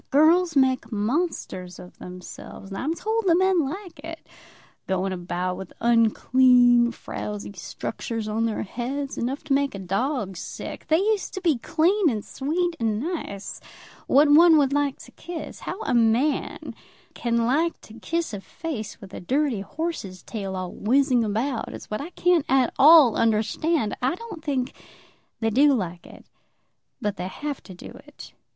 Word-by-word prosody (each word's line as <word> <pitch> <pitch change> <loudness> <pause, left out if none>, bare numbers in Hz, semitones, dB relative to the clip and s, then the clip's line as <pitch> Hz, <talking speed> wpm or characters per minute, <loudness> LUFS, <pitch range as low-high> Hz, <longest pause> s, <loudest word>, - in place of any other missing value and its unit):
Girls 325 +4 +4
make 260 -3 +2
monsters 210 - -2
of 180 - -13
themselves, 180 +2 -10
and 195 - -5
I'm 310 +5 -1
told 445 +3 -1
the 335 - +5
men 375 -2 +3
like 355 -2 -8
it; 325 0 -8 0.6
going 190 0 -1
about 180 0 -3
with 190 -1 -9
unclean, 240 +1 +4
frowsy 210 -3 -6
structures 225 +3 -5
on 225 +2 0
their 220 - -2
heads, 265 +6 -4
enough 260 +4 -2
to 290 -2 0
make 275 -4 +1
a - - -4
dog 195 - -2
sick. - - -7
They 315 - +4
used 410 +2 0
to 380 - -4
be 320 -9 +2
clean 340 - +2
and 215 -5 -3
sweet 335 +5 -1
and 220 -2 0
nice, 275 - -5 0.5
what 290 +3 +5
one 320 +2 +7
would 280 -2 +3
like 285 -1 +1
to - - -13
kiss. 345 -2 -8
How 380 - -6
a - - -1
man 240 +5 +1 0.4
can 235 -1 0
like 315 +8 +1
to 215 - -14
kiss 320 +5 -3
a 200 - -5
face 265 -4 -6
with 195 -1 -12
a - - -6
dirty 265 - 0
horse's 200 - -5
tail 195 -4 -5
all 185 -1 -4
whizzing 255 +1 +2
about 225 +4 -1
it, - - -8
is - - -11
what 215 - -2
I 305 - -6
can't 355 -3 +2
at 265 -2 +3
all 295 -5 +8
understand. 225 +4 +1
I 255 +6 +1
don't 400 -6 -9
think 270 -4 -1 0.7
they 225 0 +1
do 280 +4 +5
like 180 -6 -4
it, - - -14 0.7
but 205 -1 -2
they 180 - -3
have 290 +8 -5
to 185 - -12
do - - -10 0.2
it." - - -13
255 Hz, 170 wpm, -24 LUFS, 210-315 Hz, 0.7 s, all